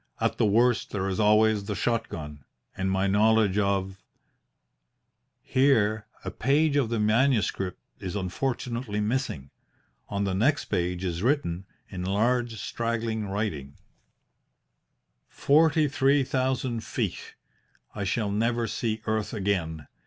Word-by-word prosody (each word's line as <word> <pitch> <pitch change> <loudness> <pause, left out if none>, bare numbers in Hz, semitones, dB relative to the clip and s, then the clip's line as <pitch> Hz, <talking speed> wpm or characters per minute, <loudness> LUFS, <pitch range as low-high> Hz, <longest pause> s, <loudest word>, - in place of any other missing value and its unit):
At - - 0
the - - +4
worst 120 +3 +2
there 95 -2 -2
is 95 +2 -2
always 105 -1 +4
the 105 0 -3
shot 115 +3 -1
gun 75 -3 -8 0.3
and 95 0 -1
my 95 0 +1
knowledge 105 0 +3
of.. 95 -1 -1 0.7
." - - -51 0.7
Here 110 -6 +2 0.2
a - - -3
page 145 +2 +2
of 135 -6 +2
the 115 -1 -1
manuscript 105 -4 +1 0.2
is 95 0 -5
unfortunately 115 +2 -3
missing. 105 - -2 0.6
On 100 0 -1
the 95 -1 -1
next 130 +10 +2
page 90 +1 -2
is 85 -2 -2
written, 100 - 0 0.2
in 90 -2 -6
large, 115 +5 +1
straggling 115 -1 -2
writing: 95 -9 -3 1.5
"Forty 155 +1 +3
three 140 0 +3
thousand 130 -3 -1
feet. - - -4 0.6
I 100 - -4
shall 100 +2 -1
never 115 +3 0
see 110 -1 -3
earth 110 -1 -1
again. 85 -7 -2
110 Hz, 130 wpm, -27 LUFS, 95-120 Hz, 1.5 s, the